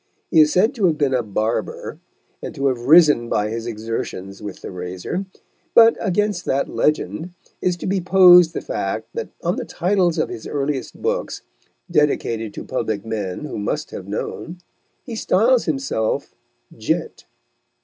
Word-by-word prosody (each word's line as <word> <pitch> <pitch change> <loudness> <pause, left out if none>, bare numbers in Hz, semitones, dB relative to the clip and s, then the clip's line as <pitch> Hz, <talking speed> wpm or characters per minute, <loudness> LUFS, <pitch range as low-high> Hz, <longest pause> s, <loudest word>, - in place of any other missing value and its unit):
He 160 - +7
is 150 0 +4
said 195 +7 +3
to 205 -6 +2
have 160 -3 +1
been 140 -3 +1
a 125 - +2
barber, 110 +1 -3 0.4
and - - -7
to 140 - -2
have 125 -1 -4
risen 150 -7 +6
by 105 0 0
his 115 +1 -4
exertions 110 -4 -5
with 105 -3 -8
the - - -6
razor; 90 - -5 0.5
but, 230 0 +8
against 205 -2 0
that 135 +1 0
legend, 160 +3 -1 0.3
is 180 -1 0
to - - -7
be 190 0 0
posed 180 -2 +7
the - - -2
fact - - -3
that 465 - -4
on - - 0
the - - -2
titles 180 -2 +1
of - - 0
his 115 - -7
earliest 140 -1 -3
books, 475 +3 -2 0.5
dedicated 115 -8 +1
to - - -6
public 110 -5 -3
men 105 +2 -4
who 140 - -5
must 105 - -3
have - - -8
known, 170 +2 -5 0.5
he 235 - -7
styles 230 +4 +3
himself 135 -7 -2 0.4
"Gent." - - -3
150 Hz, 160 wpm, -21 LUFS, 115-180 Hz, 0.5 s, but